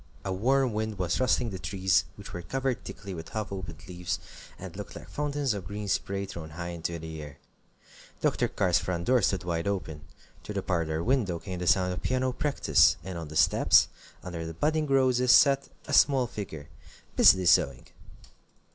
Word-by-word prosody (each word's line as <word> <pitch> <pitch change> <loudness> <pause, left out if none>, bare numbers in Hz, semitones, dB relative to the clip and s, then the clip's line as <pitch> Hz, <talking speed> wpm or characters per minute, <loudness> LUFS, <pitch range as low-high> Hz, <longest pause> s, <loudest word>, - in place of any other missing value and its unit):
A 95 - -1
warm 130 +5 +2
wind 110 -1 -2
was 90 -2 -1
rustling 125 -2 +1
the 95 - -6
trees, 95 -5 +1
which 100 - -11
were 90 - -5
covered 130 +1 -2
thickly 95 0 -8
with 80 -2 -8
half 110 -2 -4
opened 90 -5 -7
leaves, 90 -1 -3 0.4
and - - -9
looked - - -8
like - - -10
fountains 145 -3 -1
of 95 -4 -6
green 105 0 -5
spray 100 0 -1
thrown 85 -5 -8
high 85 +3 -6
into 85 0 -4
the 80 -1 -7
air. 75 -1 -10 0.8
Dr. - - +1
Carr's 90 -3 +1
front 85 -1 -3
door 125 -1 +4
stood 95 -1 +1
wide 85 0 -2
open. 85 -7 -3 0.4
Through 105 - -7
the 100 - -2
parlor 85 -3 -1
window 115 -8 +1
came 90 +2 -6
the 90 - -3
sound 90 0 +3
of 90 - -6
piano 130 0 0
practice, 145 +2 +3
and 95 0 -6
on 85 -2 -5
the 75 - -10
steps, - - +5 0.3
under 85 -2 -5
the 80 0 -6
budding 155 - 0
roses, 130 -2 +3
sat 140 -1 +5 0.2
a - - -5
small 135 -3 +5
figure, 95 -11 -7 0.5
busily 95 -1 +6
sewing. 70 -6 +3
95 Hz, 185 wpm, -28 LUFS, 85-125 Hz, 0.8 s, busily